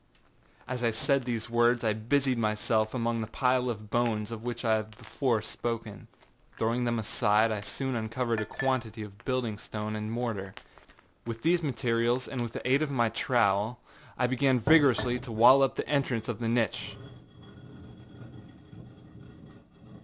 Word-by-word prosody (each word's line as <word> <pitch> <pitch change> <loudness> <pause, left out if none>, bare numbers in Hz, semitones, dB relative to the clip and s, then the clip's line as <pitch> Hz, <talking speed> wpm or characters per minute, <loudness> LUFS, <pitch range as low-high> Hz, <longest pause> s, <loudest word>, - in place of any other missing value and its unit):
â - - -33
As 125 - -4
I 120 - +2
said 130 +4 0
these 115 -3 -3
words 120 0 +2
I 110 -2 +2
busied 125 +3 0
myself 110 +1 0
among 115 -1 -1
the 110 - -4
pile 125 +2 +1
of 105 -3 -6
bones 115 -2 0
of 115 -1 -6
which 120 0 -5
I 110 -1 +3
have 110 0 -7
before 115 -1 -1
spoken. 110 -6 -5 0.5
Throwing 115 +2 0
them 120 -1 0
aside, 110 0 +2
I 105 -2 -2
soon 135 +6 -4
uncovered 115 0 -1
a 110 - -2
quantity 120 -5 -2
of 100 -1 -12
building 120 -5 -1
stone 105 0 -5
and 105 +1 -4
mortar. 110 -5 -3 0.7
With 115 -1 -5
these 170 +2 +3
materials 120 -2 0
and 130 -3 -4
with 120 -1 -4
the - - -5
aid 135 +3 +3
of 155 - 0
my 120 -5 +1
trowel, 110 -1 +1 0.4
I 125 - +2
began 130 0 +2
vigorously 130 -2 +4
to 125 -1 -9
wall 120 +5 +7
up 135 - +2
the - - -3
entrance 130 -6 0
of 120 -3 -4
the 115 - -2
niche. 115 -3 -1
115 Hz, 160 wpm, -29 LUFS, 110-125 Hz, 0.7 s, wall